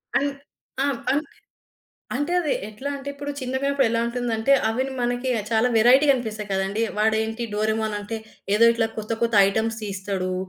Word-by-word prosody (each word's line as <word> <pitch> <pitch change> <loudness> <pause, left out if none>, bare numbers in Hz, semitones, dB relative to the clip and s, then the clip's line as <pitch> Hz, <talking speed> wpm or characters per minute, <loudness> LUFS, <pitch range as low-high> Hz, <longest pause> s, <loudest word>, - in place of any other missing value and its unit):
అన్ 285 - +2 0.5
ఆ! - - +2 0.3
అంటే 295 +1 -1 0.9
అంటే 290 +6 -1
అది 315 -5 0 0.2
ఎట్లా 215 +6 -6
అంటే 275 0 -8
ఇప్పుడు 285 +1 -6
చిన్నగా 260 0 -3
ఉన్నప్పుడు 280 -3 +2
ఎలా 230 - +1
ఉంటుందంటే 235 +1 0 0.2
అవి 225 +4 0 0.2
మనకి 245 +1 -1 0.2
చాలా 230 +2 +3
వేరైటీ 250 +6 +6
గనిపిస్తాయి 220 -5 -1
కదండీ. 195 +3 0 0.2
వాడేంటి 220 +2 +1
'డోరేమోన్' 215 0 0
అంటే 205 +2 -5 0.4
ఏదో 230 +2 +5
ఇట్లా 225 -1 +1
కొత్త 215 +1 -4
కొత్త 230 -1 -1
ఐటెమ్స్ 220 +2 -1
తీస్తడు. 190 -2 -3
230 Hz, 155 wpm, -24 LUFS, 215-260 Hz, 0.9 s, వేరైటీ